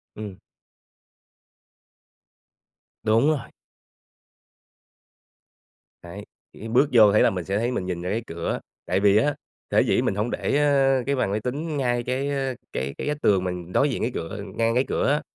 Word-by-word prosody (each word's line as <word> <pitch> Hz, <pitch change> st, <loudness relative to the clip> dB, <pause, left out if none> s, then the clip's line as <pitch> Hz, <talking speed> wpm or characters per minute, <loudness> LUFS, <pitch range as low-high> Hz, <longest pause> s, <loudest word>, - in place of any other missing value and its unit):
Ừm. 105 Hz, -3 st, -7 dB, 2.7 s
Đúng 115 Hz, +5 st, +3 dB
rồi. 140 Hz, -7 st, -2 dB, 2.5 s
Đấy, 100 Hz, +4 st, -9 dB, 0.3 s
kiểu -, -, -12 dB
như, 115 Hz, -, -5 dB
bước 125 Hz, +5 st, +3 dB
vô 110 Hz, -3 st, +7 dB
thấy 105 Hz, -, +4 dB
là -, -, +5 dB
mình 90 Hz, -3 st, -4 dB
sẽ 100 Hz, +1 st, -1 dB
thấy 120 Hz, +3 st, 0 dB
mình 95 Hz, -, -2 dB
nhìn 90 Hz, -2 st, -3 dB
ra 90 Hz, -, -4 dB
cái 115 Hz, +2 st, -1 dB
cửa. 85 Hz, 0 st, -3 dB, 0.3 s
Tại 95 Hz, -, +1 dB
vì 100 Hz, 0 st, +4 dB
á, 145 Hz, +5 st, +2 dB, 0.4 s
sở -, -, +4 dB
dĩ -, -, +2 dB
mình 95 Hz, -, 0 dB
hông 105 Hz, +3 st, -1 dB
để 145 Hz, -, 0 dB
á 135 Hz, -2 st, +3 dB
cái 140 Hz, 0 st, 0 dB
bàn 100 Hz, -6 st, 0 dB
máy 105 Hz, -, 0 dB
tính 145 Hz, +7 st, -3 dB
ngay 120 Hz, -3 st, 0 dB
cái, 130 Hz, +3 st, -2 dB
a, 135 Hz, -2 st, -1 dB, 0.2 s
cái 70 Hz, +1 st, -3 dB
cái -, -, -4 dB
vách 150 Hz, 0 st, -2 dB
tường 95 Hz, -3 st, +3 dB
mình 90 Hz, -1 st, -5 dB
đối 145 Hz, -, +3 dB
diện 130 Hz, -, -3 dB
cái 120 Hz, -, 0 dB
cửa 80 Hz, +4 st, -5 dB, 0.2 s
ngang 115 Hz, 0 st, +1 dB
cái 125 Hz, -, +3 dB
cửa -, -, 0 dB
á, 150 Hz, -, +1 dB
115 Hz, 185 wpm, -24 LUFS, 100-135 Hz, 2.7 s, vô